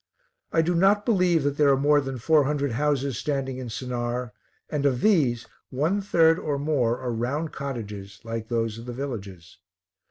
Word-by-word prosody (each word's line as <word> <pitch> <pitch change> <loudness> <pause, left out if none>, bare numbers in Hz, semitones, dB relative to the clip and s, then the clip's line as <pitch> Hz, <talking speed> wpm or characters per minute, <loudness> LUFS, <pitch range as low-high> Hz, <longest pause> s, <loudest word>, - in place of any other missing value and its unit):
I 165 - +3
do 175 +2 +1
not 195 +4 +3
believe 180 - +3
that 145 0 -1
there 145 -2 +4
are 135 - +4
more 145 +1 +4
than 135 -1 -5
four 150 +4 +3
hundred 140 -1 -1
houses 140 -1 0
standing 135 -3 -2
in 125 -2 -6
Sennaar 120 0 -3 0.4
and 150 -3 -2
of 135 -3 +1
these 135 - +2 0.2
one 155 +10 0
third 165 -3 +4
or 145 -2 -2
more 140 -5 +1
are 125 - -4
round 130 +8 -2
cottages, 105 -8 -6
like 115 -1 -5
those 115 -1 -1
of 115 - -10
the 120 - -5
villages. 100 -11 -7
135 Hz, 180 wpm, -25 LUFS, 120-150 Hz, 0.4 s, there